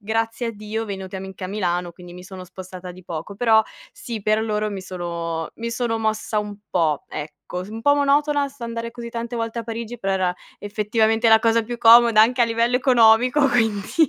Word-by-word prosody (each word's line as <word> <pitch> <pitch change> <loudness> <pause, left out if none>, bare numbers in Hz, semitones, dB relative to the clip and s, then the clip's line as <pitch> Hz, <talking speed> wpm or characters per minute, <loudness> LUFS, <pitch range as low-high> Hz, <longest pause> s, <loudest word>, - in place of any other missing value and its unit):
grazie 225 +3 -2
a - - -1
Dio 215 +2 -5
venuti 190 -2 -7
a 190 - -6
Mi 190 - -7
anche 190 0 -8
a - - -2
Milano, 180 -3 -2
quindi 175 0 -13
mi 180 0 -11
sono 185 -1 -9
spostata 185 0 -9
di 185 0 -15
poco. 165 +4 -6
Però 220 -1 +4 0.3
sì, 230 -4 -7
per 215 +1 +2
loro 215 -1 -1
mi 195 -2 -5
sono, 170 -3 -4
mi 235 0 -4
sono 230 -1 -1
mossa 220 0 -1
un 205 -1 -7
po', 160 -5 +1
ecco. 150 0 -7 0.3
Un 225 +1 -7
po' 285 +2 +5
monotona 285 0 +2
s 275 -2 -20
andare 230 0 -4
così 235 -1 -8
tante 235 +1 -5
volte 230 0 -3
a - - -7
Parigi, 230 +1 -5
però 195 -3 -1
era 180 -1 0 0.2
effettivamente 220 +2 +1
la 220 0 +7
cosa 230 0 +2
più 240 +1 -6
comoda, 230 -1 +7
anche 245 +3 +2
a - - +6
livello 230 +1 0
economico, 250 +2 +4
quindi 225 +6 +1
220 Hz, 210 wpm, -22 LUFS, 190-235 Hz, 0.3 s, la